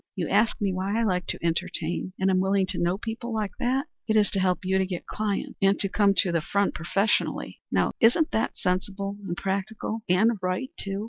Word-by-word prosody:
You - - -2
ask 225 - +2
me 200 -2 0
why 195 +4 -1
I - - +2
like 180 -4 0
to - - -4
entertain 175 +1 -2
and 190 0 +2
am 185 - +3
willing 190 0 +2
to - - -2
know 175 +2 +1
people 230 +2 -5
like 215 -3 -1
that. 260 +3 +1 0.2
It 220 - +2
is 210 -1 +4
to 195 - 0
help 185 0 +1
you 190 +1 +2
to 190 - +2
get 180 -2 -5
clients 210 -2 -3
and 195 +1 +4
to 195 - +2
come 200 0 +3
to 180 - +3
the 170 -1 +1
front 200 +5 0
professionally. 195 +5 0
Now - - +2
isn't 275 +8 +4
that 220 - -1
sensible 195 +2 -2
and 175 -1 -3
practical 200 +3 -3
and 210 +4 +3
right, 185 +10 -2
too?" 195 0 -3
195 Hz, 215 wpm, -26 LUFS, 185-215 Hz, 0.2 s, is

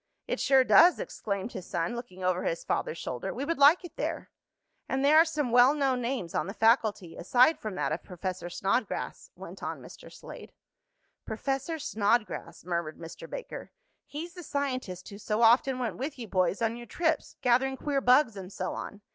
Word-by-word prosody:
"It - - -2
sure 265 -1 +5
does!" 345 +7 +6
exclaimed 200 +2 -4
his 185 -5 -8
son, 170 +7 -2
looking 210 -6 -8
over 185 0 +1
his 165 - -2
father's 160 - -2
shoulder. 125 -6 -4
"We 265 +4 -4
would 330 0 -2
like 300 +6 +6
it 350 - -12
there." - - -4 0.6
"And 265 +1 0
there 300 +2 +6
are 325 - +7
some 300 -6 -2
well 245 +4 +6
known 270 -4 +1
names 235 -8 -3
on - - -1
the 195 - -6
faculty, 220 -6 +2
aside 250 - +3
from 215 -3 -5
that - - -1
of 160 - -2
Professor 180 -1 -5
Snodgrass," 195 +5 -2
went - - -10
on - - -4
Mr. - - -13
Slade. - - -11 0.7
"Professor 270 +7 -3
Snodgrass," 210 - -1
murmured 170 -3 -3
Mr. 165 -1 -10
Baker. - - -7 0.4
"He's 330 +4 -7
the 360 - -9
scientist 255 - -3
who 200 - -10
so 215 +2 0
often 250 +3 +5
went 245 -3 -3
with 275 +3 -4
you 235 -3 -7
boys 185 +2 0
on 225 +1 0
your 240 0 -10
trips, 325 -3 -1
gathering 260 +2 +2
queer 280 0 -1
bugs 250 -2 +4
and 190 -1 -8
so - - -4
on." 205 - -7
240 Hz, 190 wpm, -29 LUFS, 190-275 Hz, 0.7 s, are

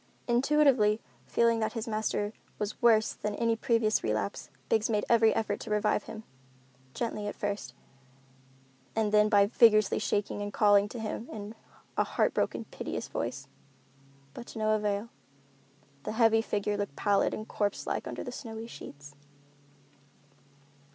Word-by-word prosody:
Intuitively 245 -4 +3 0.3
feeling 230 -1 +2
that 220 - -1
his 230 0 -4
master 215 -1 -1 0.2
was 210 0 -4
worse 220 -2 +4
than 210 0 -4
at - - -8
any 230 -1 +2
previous 225 -2 +1
relapse, 110 -2 -2 0.2
Biggs 220 0 +1
made 210 -2 +1
every 230 -1 +5
effort 210 -2 -1
to - - -8
revive 210 0 +1
him, 220 -1 -8 0.7
gently 215 -3 -3
at 205 - -4
first, 200 -12 -4 1.2
and 220 -2 +1
then 210 0 +5
by 200 -1 +5
vigorously 215 -1 +4
shaking 205 -1 -1
and 205 0 -4
calling 205 0 +4
to 240 - -7
him 220 +1 -5
in 210 0 -7 0.4
a - - +4
heart - - 0
broken, - - -1
piteous - - -5
voice. - - -4 0.9
But 240 - -9
to - - -10
no 215 0 +1
avail. 210 +1 -1 0.9
The - - -4
heavy 225 -1 +4
figure 205 -2 -1
looked 205 -8 -4
pallid 200 +4 +2
and 215 - -6
corpse 205 -1 -2
like - - -3
under - - -5
the - - -6
snowy 225 -3 -7
sheets. 145 -10 -11
215 Hz, 150 wpm, -29 LUFS, 205-225 Hz, 1.2 s, every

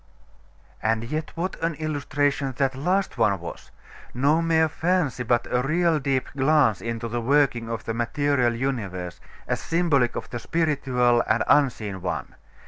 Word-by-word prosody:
'.... - - -32 0.3
And 110 0 +1
yet, 155 +6 -3
what 180 +1 -3
an 165 -1 0
illustration 145 -2 -1
that 135 -1 +1
last 180 0 -1
one 100 -4 +3
was! 85 0 -9 0.5
No 145 +6 +3
mere 160 -1 +3
fancy, 160 -5 0
but 120 0 +1
a 125 - +2
real 165 +3 +2
deep 135 -2 0
glance 135 -6 +3
into 115 0 -3
the 120 +1 -3
working 125 -3 +2
of 115 -1 -4
the 115 - -2
material 120 +1 +1
universe, 100 -9 -3 0.3
as - - -1
symbolic 150 -8 +1
of - - -4
the 120 - -4
spiritual 130 -7 +1
and 110 +2 +2
unseen 110 -9 +2
one. 90 - -4
135 Hz, 155 wpm, -24 LUFS, 115-155 Hz, 0.5 s, one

